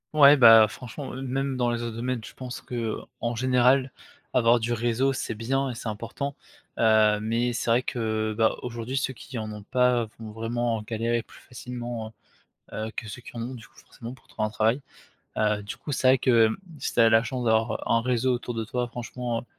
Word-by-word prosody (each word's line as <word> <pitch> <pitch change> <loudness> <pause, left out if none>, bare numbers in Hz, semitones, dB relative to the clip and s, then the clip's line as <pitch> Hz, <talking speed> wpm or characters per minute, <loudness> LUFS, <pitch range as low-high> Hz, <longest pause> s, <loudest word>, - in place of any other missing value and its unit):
Ouais, 145 -1 +8
bah, 115 -4 +8
franchement, 125 +5 -8
heu, 130 - -6
même 135 +1 -2
dans 120 -1 +1
les 120 0 -2
autres 115 -1 -4
domaines, 120 +1 -2
je - - -10
pense 125 -2 -7
qu'en 120 -1 -4
général 130 +2 +3 0.4
avoir 120 -1 +4
du 115 +1 -1
réseau 120 +3 +1
c'est 120 - -3
bien 135 +5 -1
et - - -3
c'est 115 - -7
important. 115 +6 -5 0.4
Heu, 110 -2 +4
mais 115 +3 0
c'est 115 - -2
vrai 120 +2 +4
que, 125 - -5 0.3
heu, - - -3
bah, 110 -1 +3
aujourd'hui 120 +2 -4
ceux 135 -1 -1
qui 130 +1 -9
en 110 -1 -4
ont 105 -1 -9
pas 125 0 +2
vont 110 -1 -8
vraiment 115 +1 -2
galérer 115 +2 -1
plus - - -17
facilement, 120 -2 -6 0.6
heu - - -8
heu, - - -7
que 115 - -5
ceux 125 - -8
qui - - -12
en - - -3
ont 125 +3 -5
du 115 0 -12
coup - - -21
forcément 120 0 -10
pour 130 - -19
trouver 110 - -2
un - - -2
travail. 110 +5 +1 0.6
Heu, 105 -1 +1
du 105 +4 -7
coup 145 +4 -5
c'est 130 - +1
vrai 130 - +6
que, 120 -3 +4 0.3
si 130 - -3
tu - - 0
as 115 -1 +7
la 110 0 +5
chance 125 +1 -3
d'avoir 110 0 +1
un 115 - +3
réseau 125 +1 +1
autour 120 0 -4
de 115 -1 -3
toi 125 +2 -2
franchement, 120 0 -4
heu, - - -14
120 Hz, 220 wpm, -26 LUFS, 115-125 Hz, 0.6 s, Ouais